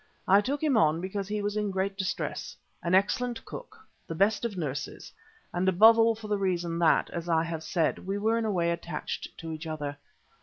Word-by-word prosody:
I 200 +2 +6
took 280 +7 -2
him 285 -6 +3
on 155 -2 +3
because 190 +2 -4
he 210 0 -2
was 205 0 -1
in 210 -1 0
great 195 +1 -1
distress, 190 -2 -3 0.2
an 175 +2 +2
excellent 235 +4 +1
cook, - - -9 0.3
the 165 - -4
best 200 +6 +2
of 220 -5 -3
nurses, 145 -5 -5 0.4
and 180 +2 +2
above 220 +5 +7
all 225 0 +4
for 220 0 -9
the 210 -1 0
reason 175 -3 -1
that, 170 - +3
as 170 0 -5
I 165 -1 +3
have 165 -1 -4
said, 165 0 0
we 195 +2 -3
were 220 +3 +1
in 225 - -1
a 215 - 0
way 170 -3 +1
attached 170 -2 -4
to 165 0 -6
each 160 +1 -6
other. 150 -2 -4
190 Hz, 215 wpm, -28 LUFS, 165-210 Hz, 0.4 s, above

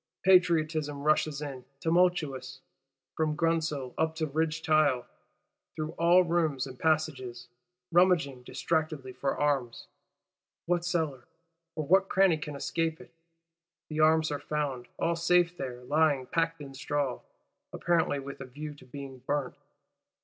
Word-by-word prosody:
Patriotism 155 -5 +3
rushes 150 -1 +1
in, 135 -3 -6 0.2
tumultuous, 165 -5 +1 0.6
from 155 -1 0
grundsel 160 -5 0
up 160 0 +1
to 160 -1 -1
ridge 160 +2 -1
tile, 145 -5 +3 0.7
through 155 0 -3
all 170 +2 +5
rooms 160 -6 0
and 130 -2 -10
passages; 135 -7 -1 0.4
rummaging 165 -7 +3
distractedly 140 +1 -2
for 140 - -2
arms. 135 -5 0 0.8
What 175 0 +1
cellar, 160 -8 -1 0.5
or 155 - -3
what 190 +4 +4
cranny 190 -4 +4
can 150 -1 -6
escape 165 +3 -2
it? - - -14 0.8
The 155 0 -4
arms 155 0 +4
are 145 - -2
found; 140 -5 -3
all 170 0 +1
safe 175 +1 +3
there; 125 -5 -6
lying 145 -1 +2
packed 165 +3 -1
in 140 -1 -9
straw,—apparently 145 +3 -2
with 140 0 -7
a - - -5
view 150 +4 -7
to 145 -3 -16
being 135 0 -8
burnt! 135 +1 -2
155 Hz, 130 wpm, -29 LUFS, 140-165 Hz, 0.8 s, all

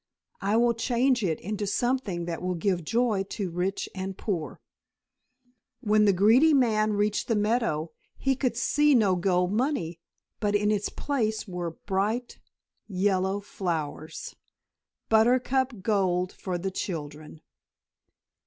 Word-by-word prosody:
I 205 +3 +1
will 235 0 +4
change 245 +1 +1
it 165 -5 0
into 205 +2 -3
something 210 -6 -1
that 170 -1 -4
will 180 0 -1
give 175 0 0
joy 225 +2 +1
to 195 -5 -3
rich 180 +3 -2
and 190 0 -5
poor." 175 -8 -3 1.2
When 210 0 +3
the 200 - +6
greedy 230 - +5
man 215 -5 +2
reached 210 0 0
the 230 - +1
meadow 210 -7 0 0.3
he 270 0 +1
could 250 -3 -1
see 295 +3 +3
no 205 -6 +4
gold 180 0 +1
money, 210 - -1 0.4
but 205 -1 0
in 210 +1 +2
its 205 -1 0
place 220 -7 -2
were 175 -2 -3 0.2
bright, 210 +5 -1 0.5
yellow 190 0 0
flowers 160 -6 -4 0.7
buttercup 245 0 +2
gold 185 -4 +1
for 185 -2 -4
the 190 +2 -3
children. 155 -4 -6
205 Hz, 130 wpm, -27 LUFS, 180-230 Hz, 1.2 s, the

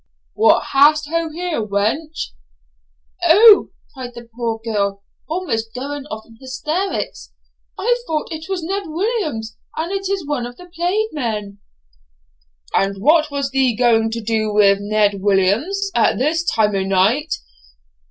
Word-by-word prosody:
'What 445 - +4
hast 295 +2 +5
ho 335 0 -1
here, 335 -3 -3
wench?' 215 +11 -2 0.9
'O!' 405 +6 +7 0.2
cried 250 -3 -8
the 235 0 -10
poor 230 -2 -2
girl, 200 -3 -1 0.3
almost 225 -11 -2
going 280 +2 -5
off 220 -5 -7
in 225 -1 -19
hysterics, 310 +9 -3 0.5
'I 485 +4 +1
thought 310 -2 -2
it 320 +2 -7
was 375 -3 -2
Ned 390 +2 -3
Williams, 315 - -2 0.2
and 325 +3 -2
it 390 -1 -2
is 390 -4 -2
one 285 -5 -2
of 245 - -12
the 360 - -12
plaid 380 +6 0
men.' 210 -8 -4 1.1
'And 195 0 +1
what 305 +6 +4
was 280 -1 -2
thee 265 -3 +2
ganging 225 -1 +3
to 230 +1 -4
do 215 -1 0
wi' 205 -1 +5
Ned 205 -1 +1
Williams 210 - +1
at 230 - +3
this 310 +6 +1
time 210 -2 +2
o' 195 - +1
noight?' 195 +11 +2
270 Hz, 145 wpm, -19 LUFS, 220-330 Hz, 1.1 s, O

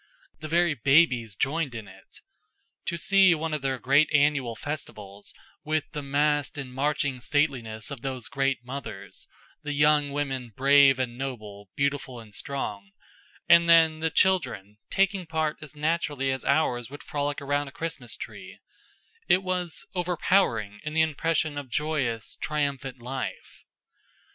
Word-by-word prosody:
The 155 - -6
very 170 +1 +3
babies 135 - +3
joined 140 - -1
in 110 -3 -7
it. - - -16 0.6
To 170 - -2
see 190 0 +5
one 160 0 -3
of 150 - -2
their 135 -1 -1
great 140 +5 +3
annual 145 -5 +2
festivals, 105 -8 -7 0.3
with 155 0 -1
the 150 - -4
massed 145 +1 +1
and 130 -3 -6
marching 135 -1 0
stateliness 120 -5 0
of 135 -4 -6
those 130 -3 -4
great 135 -2 -1
mothers, 125 -7 -8 0.3
the 150 -2 -4
young 150 0 +4
women 135 -5 -3
brave 140 0 +6
and 125 -1 -3
noble, 105 -7 -6
beautiful 140 -3 -1
and 110 -2 -14
strong; 100 -7 -5 0.5
and 170 0 +6
then 160 -1 +6
the 160 0 0
children, 125 - +1
taking 195 -2 +1
part 160 -1 -1
as 150 -1 -10
naturally 150 -3 0
as 130 - -3
ours 125 -5 +1
would 145 +2 -10
frolic 145 -1 -2
round 145 0 -1
a - - -15
Christmas 165 +3 -5
tree - - -9 0.7
it 185 - +4
was 180 -3 -2
overpowering 175 - +1
in 155 - -5
the 160 - +5
impression 155 -1 0
of 140 -3 -9
joyous, 130 -5 -1
triumphant 140 -4 -2
life. 130 +2 -6
145 Hz, 145 wpm, -27 LUFS, 125-155 Hz, 0.7 s, brave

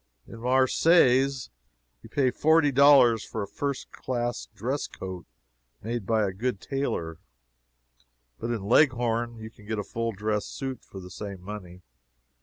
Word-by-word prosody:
In 115 - -10
Marseilles 130 - +3 0.5
you - - -14
pay 130 -3 +1
forty 155 +2 +3
dollars 135 -4 +6
for 110 - -4
a - - -6
first 140 +5 -4
class 120 -2 -3
dress 125 +7 -2
coat 95 -2 -8 0.6
made 115 -2 -4
by 110 -2 +2
a 95 - -4
good 115 +1 -2
tailor, 85 - -3 1.2
but 115 - -4
in 115 -4 -2
Leghorn 120 -1 +2
you 110 0 -9
can 105 -3 -18
get 110 -1 -2
a 105 - -2
full 115 +3 -3
dress 105 0 -2
suit 135 -3 -6
for 95 - -10
the 90 -1 -11
same 100 0 -7
money. 90 -2 -9
115 Hz, 150 wpm, -27 LUFS, 105-130 Hz, 1.2 s, dollars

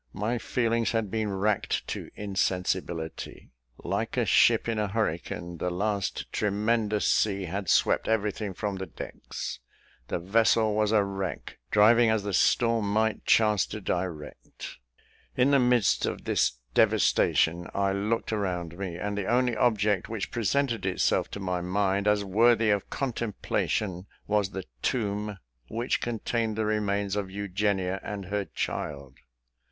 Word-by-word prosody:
My 115 +4 -1
feelings 115 -1 0
had 110 -4 -1
been 110 -2 -1
racked 100 +1 0
to - - -5
insensibility. 95 -4 -2 0.3
Like - - -3
a - - +2
ship - - +4
in 115 -2 -1
a 105 - 0
hurricane, 85 -4 -3
the 90 - -1
last 100 +2 -2
tremendous 105 +1 +1
sea 100 -2 +2
had 95 +2 -4
swept - - +3
everything 105 -2 -1
from 100 -1 -3
the 95 0 -5
decks 80 - -7 0.5
the - - -1
vessel 110 +4 +3
was 105 0 +1
a 105 -2 +4
wreck, 95 -1 -5
driving 115 +3 +5
as 110 -2 +1
the 100 -1 -3
storm 115 +1 +2
might 110 +1 0
chance 105 -3 +4
to 105 - -6
direct. 90 -6 -5 0.6
In 130 +3 +4
the 140 - +5
midst 125 -4 +3
of - - -4
this - - +2 0.2
devastation, 85 +2 +3
I 100 0 +1
looked 110 +3 -1
around 90 -4 -3
me, 95 -4 -4
and 100 +3 -3
the 100 -2 -3
only 125 +1 +2
object 105 -4 +1
which 110 -3 -4
presented 120 +2 0
itself 95 -1 +1
to - - -6
my 90 -2 -2
mind, 100 +2 0
as 105 -1 +2
worthy 115 +2 +4
of 100 -1 -1
contemplation, 105 -6 -2 0.2
was 105 -2 +1
the 95 -2 -6 0.2
tomb 105 -3 -1 0.3
which 120 - -1
contained 115 -1 -1
the 110 0 -1
remains 100 -2 0
of 100 -2 -2
Eugenia 95 -1 -1
and 100 -2 -5
her 100 +1 -2
child. 70 -7 -5
105 Hz, 145 wpm, -27 LUFS, 95-110 Hz, 0.6 s, driving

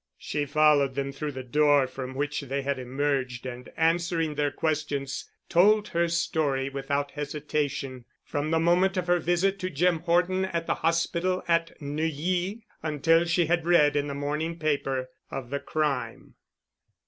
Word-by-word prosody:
She 145 -1 -3
followed 150 -2 +4
them 140 0 -2
through 145 +1 -4
the 130 0 -6
door 145 +1 +4
from 130 0 -7
which 145 +2 -2
they 140 0 -3
had 140 -1 -1
emerged 130 -1 -2
and 125 -1 -7
answering 165 -1 +1
their 145 0 0
questions 145 -2 -2 0.2
told 210 +5 +4
her 170 0 +1
story 155 -5 0
without 140 +1 -2
hesitation, 145 -3 -3 0.2
from 145 +1 -3
the 165 - +2
moment 180 +3 +3
of 180 - 0
her 175 0 +3
visit 175 +4 +1
to 185 - -2
Jim 170 +2 +2
Horton 180 +3 +2
at 170 -3 -3
the - - +1
hospital 170 +2 +1
at 165 -1 +1
Neuilly 165 +8 -2 0.2
until 160 +2 +3
she 170 0 +2
had 170 +1 0
read 150 -4 +5
in 145 0 +1
the 140 - -4
morning 150 +4 -2
paper 140 -4 -1 0.2
of 130 -2 -6
the 140 - -1
crime. 140 -8 -2
150 Hz, 160 wpm, -27 LUFS, 140-170 Hz, 0.2 s, read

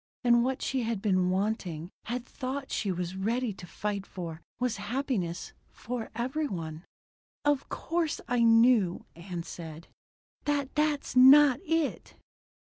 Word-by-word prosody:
And 240 -1 +5
what 260 +1 -1
she 265 -1 0
had 230 -3 -1
been 185 -3 +2
wanting 185 -4 -2
had 245 +1 -3
thought 265 +1 -5
she 200 - 0
was 180 0 -3
ready 225 +4 -1
to 180 -2 -11
fight 200 +1 -3
for 170 -3 -7 0.2
was 250 -2 0
happiness 205 -5 -2 0.2
for 240 -1 -5
every 260 +6 -1
one. 160 - -5 0.6
"Of 290 -2 +1
course 330 -2 -1
I 245 0 +1
know," 225 -5 +4
Ann 170 0 -6
said, 165 -1 -9 0.6
"that 285 -2 0
that's 300 -3 0
not 265 +1 +8
it." 325 -4 -1
230 Hz, 140 wpm, -29 LUFS, 185-265 Hz, 0.6 s, not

